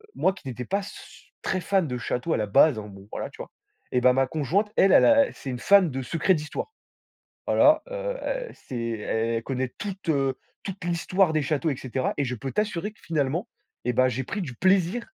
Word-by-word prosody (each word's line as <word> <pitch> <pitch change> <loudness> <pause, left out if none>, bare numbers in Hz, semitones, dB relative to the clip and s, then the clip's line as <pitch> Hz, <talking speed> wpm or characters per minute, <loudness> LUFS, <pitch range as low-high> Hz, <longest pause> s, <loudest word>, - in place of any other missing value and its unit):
moi, 190 - +2
qui 190 - -13
n'étais 125 -1 -5
pas 200 +2 0
su 200 - -12
très 185 - -1
fan 190 -3 +1
de 125 -2 -3
châteaux, 125 +6 -2
à - - +1
la 105 - -1
base, 130 +6 +5
alors, 105 -1 -8
bon, 100 0 -13
voilà, - - -4
tu - - -16
vois? - - -9 0.4
Eh 125 - +2
ben, 125 0 +6
ma 135 +1 +3
conjointe, 165 - 0
elle, 195 - +5
elle - - +7
a 285 -1 +5
c'est 135 - -8
une 125 - -5
fan 195 -1 +5
de 135 0 -3
secrets 165 +8 +1
d'histoire. 150 - -5 0.8
Voilà, - - +5
heu - - -3 0.3
et - - -12
c'est 130 - -8
el 115 -2 -3 0.4
elle 115 - -4
connaît 130 0 -2
toute, 195 -4 -5
heu, 135 -3 +1 0.3
toute 195 -2 -6
l'histoire 175 +1 +1
des 155 - +2
châteaux 150 +3 0
et - - -2
cetera 130 0 -2
et 140 - +1
je 125 0 -3
peux 135 +3 -5
t'assurer 210 -2 -1
que, 215 - -27
finalement 155 +1 -1 0.4
et 125 - +2
ben, 130 +2 +4
j'ai 130 +2 -2
pris 205 +10 -4
du 135 -9 -6
plaisir 190 - +2
155 Hz, 225 wpm, -26 LUFS, 130-190 Hz, 0.8 s, elle